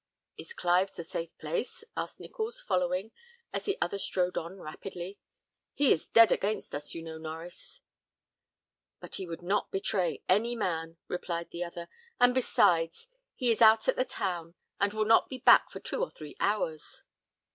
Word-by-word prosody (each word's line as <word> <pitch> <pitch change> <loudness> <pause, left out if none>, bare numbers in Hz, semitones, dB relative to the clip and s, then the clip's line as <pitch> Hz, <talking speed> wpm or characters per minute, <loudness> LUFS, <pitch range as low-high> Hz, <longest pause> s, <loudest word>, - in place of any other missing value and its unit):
"Is 470 - -10
Clive's 180 +2 +2
a 170 - -4
safe 165 0 -4
place?" 470 -1 -3
asked - - -4
Nichols, 470 +1 -5
following, 185 - 0 0.4
as - - -3
the 400 - 0
other 190 +3 -1
strode 180 -2 0
on 170 +4 -4
rapidly. 180 +3 -7 0.6
"He 280 -2 +4
is 160 - +2
dead 230 -1 +7
against 210 +2 -1
us, 145 +1 -5
you 165 - -5
know, 160 -1 -7
Norries." 160 +2 -8 1.2
"But - - -3
he 190 - -5
would 170 +1 -7
not 195 +4 0
betray 195 -1 0
any 225 +6 +3
man," 165 -6 -2
replied 170 -1 -4
the 170 - -3
other; 170 0 -7 0.3
"and 245 0 +6
besides, 175 - +2 0.3
he 250 -3 +2
is 225 - 0
out 220 0 +7
at - - +3
the 255 - +2
town, 175 -7 -3 0.2
and 200 0 +2
will 215 0 0
not 225 +1 +5
be 260 - -4
back 255 - +6
for - - -8
two - - -3
or - - 0
three 150 -2 -11
hours." 180 -7 -1
185 Hz, 170 wpm, -30 LUFS, 170-225 Hz, 1.2 s, dead